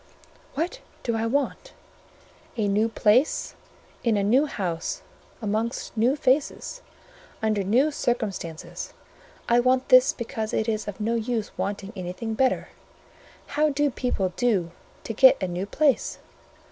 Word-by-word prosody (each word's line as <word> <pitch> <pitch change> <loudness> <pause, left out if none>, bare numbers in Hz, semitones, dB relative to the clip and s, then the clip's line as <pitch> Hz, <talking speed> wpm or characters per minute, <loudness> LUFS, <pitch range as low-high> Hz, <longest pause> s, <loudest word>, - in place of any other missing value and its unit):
"What 350 - -2 0.2
do 235 - 0
I 225 0 0
want? 285 - -1 0.8
A 215 -2 +1
new 210 +3 +2
place, 225 +6 +2 0.5
in 230 -4 +2
a 200 - +1
new 255 +9 +4
house, 175 - -3 0.4
amongst 220 +4 -2
new 235 +5 +3
faces, 285 - 0 0.6
under 215 -3 +1
new 250 +10 +3
circumstances: 205 - -3 0.5
I 235 +1 +4
want 255 +1 +2
this 255 0 +7
because 220 -2 -4
it 220 - 0
is 215 -1 -1
of 205 0 -6
no 220 +2 0
use 230 -1 -2
wanting 200 +1 -3
anything 185 +5 -4
better. 260 +3 +1 0.8
How 300 +1 +1
do 290 0 +1
people 195 -8 -1
do 200 -9 +1 0.3
to 225 - -4
get 260 +4 +7
a 185 - -1
new 180 +2 -3
place? 285 +3 +1
230 Hz, 135 wpm, -25 LUFS, 205-260 Hz, 0.8 s, this